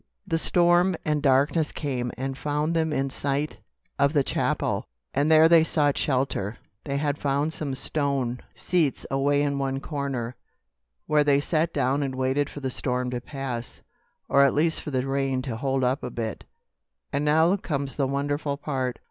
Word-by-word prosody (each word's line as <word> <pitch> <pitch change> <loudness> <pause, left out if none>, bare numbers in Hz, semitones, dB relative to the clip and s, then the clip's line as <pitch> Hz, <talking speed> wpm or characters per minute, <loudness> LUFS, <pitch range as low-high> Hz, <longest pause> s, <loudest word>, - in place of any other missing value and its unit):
The 165 -1 0
storm 175 +2 +3
and 150 -1 +1
darkness 145 +3 +3
came 125 -5 -3
and 135 +1 -3
found 150 +4 -1
them 160 -1 +1
in 135 -2 -1
sight 140 +3 -2 0.4
of 140 +1 +3
the 145 -3 +3
chapel, - - 0 0.3
and 145 +3 +2
there 160 0 +8
they 165 -1 +6
sought 145 -3 +2
shelter. 125 -6 -1 0.3
They 140 0 -2
had 145 0 -1
found 145 +3 0
some 140 -4 -3
stone 135 -4 -1 0.2
seats 165 -7 0
away 140 +1 +2
in 140 -1 0
one 135 0 -1
corner, 135 -5 -3 0.7
where 150 -1 +3
they 140 -1 +4
sat 155 +2 0
down 140 0 +1
and 135 -2 -2
waited 130 +2 0
for 145 - -8
the 130 -1 -2
storm 125 -1 -2
to 125 -1 -3
pass, 130 -3 -6 0.5
or 140 - +5
at 140 - +3
least 160 +2 +1
for - - -6
the 130 -2 -1
rain 135 -1 0
to 125 -4 -4
hold 135 +2 -1
up 130 +3 +1
a 125 - -4
bit. 115 -3 -5 0.7
"And 140 +1 0
now 160 +5 +4
comes 140 -7 -3
the 140 -2 +1
wonderful 140 +1 -1
part. 130 -4 -2
140 Hz, 175 wpm, -26 LUFS, 130-150 Hz, 0.7 s, there